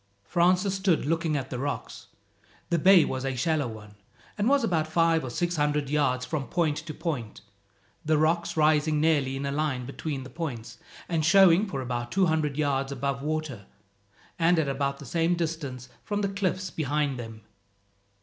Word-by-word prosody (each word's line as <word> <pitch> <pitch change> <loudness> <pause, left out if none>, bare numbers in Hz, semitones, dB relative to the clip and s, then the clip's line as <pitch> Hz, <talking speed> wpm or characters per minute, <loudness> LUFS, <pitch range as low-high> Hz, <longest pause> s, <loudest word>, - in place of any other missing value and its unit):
Francis 180 - +2
stood 190 -6 +1
looking 165 0 0
at 135 -1 -5
the 125 - -3
rocks. 145 +2 -5 0.6
The 170 - +2
bay 185 0 +6
was 130 0 -3
a 135 -1 -2
shallow 150 +2 0
one, 105 -2 -10 0.4
and 210 +3 +1
was 280 -3 +3
but 160 -6 0
five 165 0 +2
or 130 - -4
six 175 +7 -2
hundred 150 -1 0
yards 130 -4 +1
from 145 -5 -3
point 160 -4 0
to 160 0 -6
point, 130 -11 -4 0.6
the 155 0 +2
rocks 165 +2 +1
rising 155 0 +3
nearly 145 -4 +2
in 140 - -4
a 140 - -2
line 140 -4 -1
between 140 +1 -5
the 130 - -11
points, 135 -10 -6 0.3
and 165 -3 0
showing 190 +3 +6
for 140 -8 -4
about 120 -1 -4
two 190 -1 +3
hundred 155 -4 0
yards 140 -2 0
above 140 0 -2
water, 150 -8 -4 0.7
and 170 +1 +4
at 160 -3 +1
about 140 0 -1
the 140 - -11
same 165 +5 +1
distance 155 -7 -4 0.2
from 205 -1 -2
the 200 - 0
cliffs 190 -2 -2
behind 145 -3 -1
them. 115 -2 -8
155 Hz, 180 wpm, -27 LUFS, 135-170 Hz, 0.7 s, bay